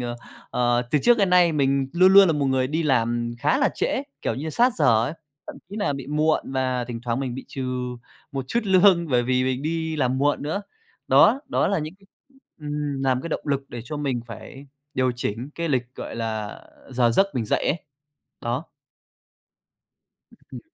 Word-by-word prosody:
ờ, 120 -1 -4 0.3
ờ, 120 0 +1
từ 150 - +3
trước 240 -1 +5
đến 195 -3 +2
nay 180 -2 +5
mình 135 -2 +1
luôn 185 +3 +5
luôn 195 0 +9
là 165 - +3
một 145 -2 0
người 130 -1 +1
đi 155 +5 -1
làm 120 -4 +1
khá 260 - +2
là 280 - +3
trễ, 265 - -1 0.2
kiểu - - -1
như, 155 +4 -4
sát 245 - +3
giờ 115 -7 +4
ấy, 145 - -3 0.3
thậm - - -8
chí 205 - -7
nà 205 -8 0
bị 140 -2 -6
muộn 150 -1 0
và 130 -2 0
thỉnh 120 -1 -6
thoảng 120 +1 -1
mình 130 -3 -3
bị 130 - -7
trừ 135 - -5 0.7
một 135 -1 -4
chút 235 - +1
lương 185 -3 +4
bởi 125 -3 +2
vì 130 +1 +1
mình 130 0 -1
đi 160 0 -2
làm 130 -2 0
muộn 145 +1 +1
nữa. 160 +8 -2 0.5
Đó, 270 - +6
đó - - +1
là 200 - +1
những 155 +2 -5 0.7
ừm, 145 -2 -3
làm 130 -1 +1
cái - - -5
động - - -3
lực 140 -1 0
để 120 - -7
cho 150 +5 -5
mình 140 -4 -1
phải 135 +4 -10 0.3
điều 130 -1 +1
chỉnh 120 +3 -4
cái 170 0 -3
lịch, 125 -3 -1
gọi - - -7
là, 110 -2 -3
à, - - -15
giờ 125 -2 +2
giấc 195 +12 +4
mình 120 - -1
dậy - - 0
ấy. 165 - 0 0.6
Đó. 120 +6 -2 1.9
Ừm. - - -7
135 Hz, 205 wpm, -24 LUFS, 125-160 Hz, 1.9 s, luôn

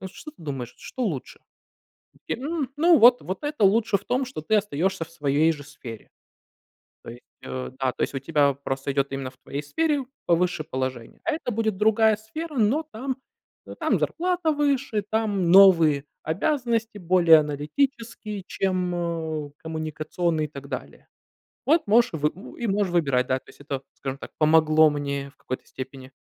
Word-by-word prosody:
вот 190 - -6
что 305 - -10
ты - - -31
думаешь, 135 -6 -5
что 260 - -6
лучше?" 165 - -3 0.7
И - - -24
такие: 260 +4 -5
"М, 310 -5 -2
ну, 330 +2 +5
вот 245 +2 +7
вот 185 +1 -5
это 295 -5 -2
лучше 210 +1 +4
в - - -10
том, 255 +2 0
что 250 -10 -6
ты 215 +8 +1
остаешься 190 -3 -1
в 165 - -18
своей 150 0 +2
же 145 -3 -9
сфере". 115 -7 -10 1.0
То - - -9
есть, 120 +1 -11 0.2
э, 130 0 -5
да, 130 -1 +1
то 125 - -3
есть - - -2
у - - -1
тебя 145 0 +2
просто 135 0 -4
идет 140 0 0
именно 135 -1 -4
в 130 - -26
твоей 140 +2 -6
сфере 290 - 0 0.2
повыше 175 -2 +2
положение, 130 -4 -5
а 335 - 0
это 305 -5 -3
будет 220 -3 -1
другая 220 +1 +4
сфера, 290 +8 -7
но 240 +8 +2
там 260 +4 -3 0.5
но - - -9
там - - +1
зарплата 355 -1 0
выше, 280 -7 0
там 205 -6 +1
новые 165 -7 +7 0.2
обязанности 230 - -1
более 170 -3 +6
аналитические, 210 - -2
чем, 185 -2 -1
э, 160 -4 -3
коммуникационные 155 +1 -2
и - - -5
так 140 -2 -10
далее. 125 - -7 0.6
Вот 310 +1 +3
можешь 235 0 +4
вы 150 -1 0
ну 190 +6 -11
и 235 - -2
можешь 195 -2 0
выбирать. 140 -7 +2
Да, 130 0 +1
то - - -22
есть - - -16
это, 140 -2 -4
скажем 135 0 -5
так, - - -10
помогло 155 0 +5
мне 140 -1 -3
в 140 - -25
какой-то 130 - -6
степени 130 0 -9
170 Hz, 180 wpm, -25 LUFS, 145-225 Hz, 1.0 s, вот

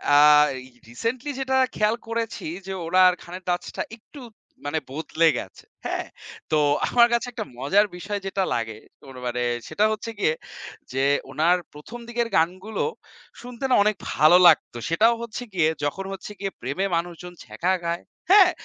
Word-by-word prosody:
আ - - +8 0.4
এই 130 - -9 0.2
recently 240 - -3
যেটা 265 0 +1 0.2
খেয়াল 215 +2 +2
করেছি 230 -4 -3 0.2
যে, 190 - -3
ওনার 185 +1 +6
গানের 180 +2 -9
touch 175 - -1
টা - - 0
একটু, 270 +5 -14 0.4
মানে 155 +2 -1
বদলে 160 +2 +1
গেছে। - - -11 0.2
হ্যাঁ? - - -2 0.4
তো 155 - +4 0.3
আমার 240 -1 +6
কাছে 235 +1 +1
একটা - - -5
মজার 195 +11 +3
বিষয় 205 +2 -4
যেটা 195 0 0
লাগে, 110 -2 -3 0.3
ওর 135 - -11
মানে 125 0 -1 0.2
সেটা 210 - +1
হচ্ছে 215 +1 -4
গিয়ে 155 - +2 0.6
যে, 135 +1 0 0.3
ওনার 170 +4 +3 0.2
১ম 220 +11 -10
দিকের 235 0 -1
গানগুলো 185 +6 -1 0.6
শুনতে 245 +1 -9
না, - - +5
অনেক 210 0 +2 0.2
ভালো 155 +4 +6
লাগত। 160 - +4 0.2
সেটাও 225 +8 +4
হচ্ছে 235 +1 -5
গিয়ে 165 -4 +3 0.2
যখন 190 +7 -3
হচ্ছে 195 +2 -8
গিয়ে 195 -1 -3
প্রেমে 140 +11 -2
মানুষজন 175 +1 -4
ছেঁকা 185 +2 -1
খায়, 170 0 -2 0.3
হ্যাঁ? 385 -3 +8
185 Hz, 160 wpm, -24 LUFS, 160-230 Hz, 0.6 s, আ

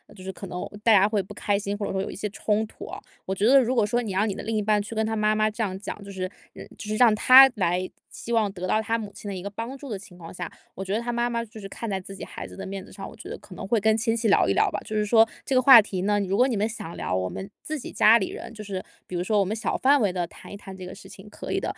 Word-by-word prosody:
就 185 - -12
是 190 - -4
可 195 - -9
能 180 0 -5 0.2
大 225 -1 +6
家 200 +1 +5
会 210 -2 +1
不 - - -11
开 205 -1 0
心， 200 0 -3
或 205 0 -3
者 - - -3
说 190 - -1
有 195 - -3
一 - - -8
些 210 +1 -3
冲 215 +1 0
突 - - -11
哦。 - - -8 0.2
我 190 - -2
觉 200 +3 +1
得 275 +3 +7
如 255 0 +1
果 230 - +3
说 240 +4 0
你 210 - -4
让 205 +3 +1
你 195 - -3
的 - - -6
另 225 0 -2
一 210 - +1
半 210 0 +2
去 225 - -8
跟 220 - 0
他 220 0 -1
妈 215 0 +2
妈 215 0 +2
这 220 +2 -3
样 190 -3 -3
讲， 210 - -7
就 200 - -9
是 185 -1 -3 0.3
呃， - - -9
就 - - -8
是 215 - -1
让 230 -1 +6
他 260 +4 +9
来， 180 -1 0 0.2
希 235 - -6
望 220 -3 +2
得 185 -1 -5
到 215 - +2
他 225 +1 -1
母 205 -2 -7
亲 205 - -10
的 200 - -4
一 185 - -5
个 200 - -5
帮 230 +6 -6
助 275 0 -10
的 210 - -3
情 195 -2 -14
况 165 -2 -10
下， 175 -2 -6 0.3
我 190 - -5
觉 190 - -2
得 225 - 0
他 240 0 -3
妈 240 0 0
妈 235 -1 -2
就 220 0 -12
是 195 - -7
看 230 +3 -6
在 195 -1 -1
自 195 +1 -10
己 - - -8
孩 - - -7
子 - - -12
的 195 0 -7
面 195 -1 -6
子 - - -16
上， - - -8
我 - - -13
觉 - - -11
得 - - -5
可 - - -13
能 - - -7
会 225 0 +2
跟 220 +1 +3
亲 225 0 0
戚 230 0 0
聊 200 - +4
一 100 - +2
聊 - - +3
吧。 - - -3
就 215 - -5
是 210 - +2
说 225 +1 +5 0.2
这 265 - -1
个 255 - +5
话 245 -3 +10
题 190 -3 -4
呢， 205 +1 +2
如 195 0 -1
果 250 - +5
你 245 - -1
们 210 +2 0
想 215 -7 -7
聊， 90 - -2
我 95 0 0
们 190 - -7
自 310 -1 -4
己 - - -8
家 225 +2 +6
里 190 - -2
人 - - -8
就 215 -2 -8
是 195 -2 -5 0.2
比 185 - -6
如 175 - -1
说 210 +2 +2
我 200 - +3
们 210 +4 -2
小 225 - -2
范 280 +2 +4
围 200 -5 +1
地 175 -2 -2
谈 - - -13
一 - - -6
谈 195 -1 -10
这 185 - -8
个 180 - -8
事 - - -13
情 195 +2 -13
可 - - -7
以 - - +1
的。 - - -14
210 Hz, 375 characters per minute, -25 LUFS, 195-225 Hz, 0.3 s, 话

